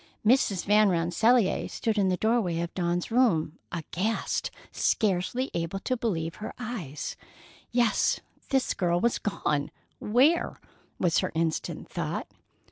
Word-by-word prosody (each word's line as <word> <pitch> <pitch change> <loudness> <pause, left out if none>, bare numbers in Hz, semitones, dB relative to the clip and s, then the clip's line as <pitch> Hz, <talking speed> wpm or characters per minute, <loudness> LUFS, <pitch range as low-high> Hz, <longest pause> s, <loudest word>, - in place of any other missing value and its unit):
Mrs. 210 -6 +3
Van 210 0 +5
Rensselaer 185 +6 +2
stood 225 -2 -1
in 200 -2 +2
the 180 - +1
doorway 220 -7 +1
of 170 - -4
Dawn's 175 +1 -1
room, 185 -11 +2
aghast, 185 +6 -2 0.2
scarcely 215 +6 0
able 170 +3 -2
to 255 - 0
believe 170 -9 -2
her 215 - -6
eyes. 215 - -5 0.5
Yes, 240 -2 +2 0.3
the 265 -2 +2
girl 175 -1 +1
was 235 +5 +1
gone. 150 -8 -1 0.3
Where? 270 +10 +2 0.4
was 175 -3 +2
her - - -1
instant 160 -1 -1
thought. - - -3
195 Hz, 125 wpm, -28 LUFS, 170-235 Hz, 0.5 s, Van